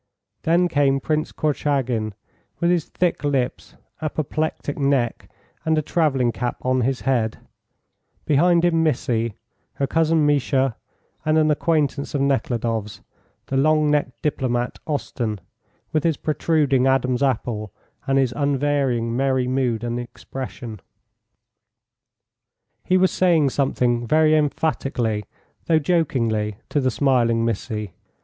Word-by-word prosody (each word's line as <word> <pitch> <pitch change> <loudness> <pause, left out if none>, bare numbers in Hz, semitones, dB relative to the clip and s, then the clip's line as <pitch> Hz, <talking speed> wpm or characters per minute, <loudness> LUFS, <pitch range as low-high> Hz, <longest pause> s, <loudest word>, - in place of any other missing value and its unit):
Then 175 +2 +3
came 140 -4 +2
Prince 155 +2 -1
Korchagin, 130 -8 -1 0.4
with 170 0 +2
his 175 -3 +1
thick 180 -4 -1
lips, 135 -3 -1 0.3
apoplectic 155 -1 -2
neck, 135 -4 0 0.3
and 160 0 +1
a 155 - +1
travelling 140 -8 +1
cap 120 +1 -3
on 130 0 +1
his 130 +1 0
head; 120 -5 0 0.9
behind 170 +4 +4
him 165 -2 +3
Missy, 120 -7 0 0.4
her 140 - -1
cousin 160 +1 +2
Misha, 135 -3 +2 0.5
and 155 +1 +2
an 155 -1 +4
acquaintance 150 -2 0
of 140 - +1
Nekhludoff's 115 -6 -1 0.4
the 135 - -2
long 155 +1 +3
necked 130 -5 0
diplomat 125 -4 -1
Osten, 120 -8 -2 0.5
with 155 - +1
his 165 -3 +1
protruding 145 -4 +1
Adam's 130 -1 +1
apple 115 -6 -1 0.4
and 135 0 +2
his 130 -3 +2
unvarying 135 -4 0
merry 130 -1 +1
mood 125 -3 0
and 120 0 -2
expression. 120 -2 -7 2.0
He 185 - +3
was 185 0 +3
saying 165 -7 +3
something 120 -3 0
very 155 +3 +4
emphatically, 135 -8 0 0.4
though 165 - +4
jokingly, 120 - 0
to 145 - +1
the 130 - +2
smiling 120 -3 +2
Missy. 105 -3 -3
135 Hz, 120 wpm, -22 LUFS, 120-155 Hz, 2.0 s, behind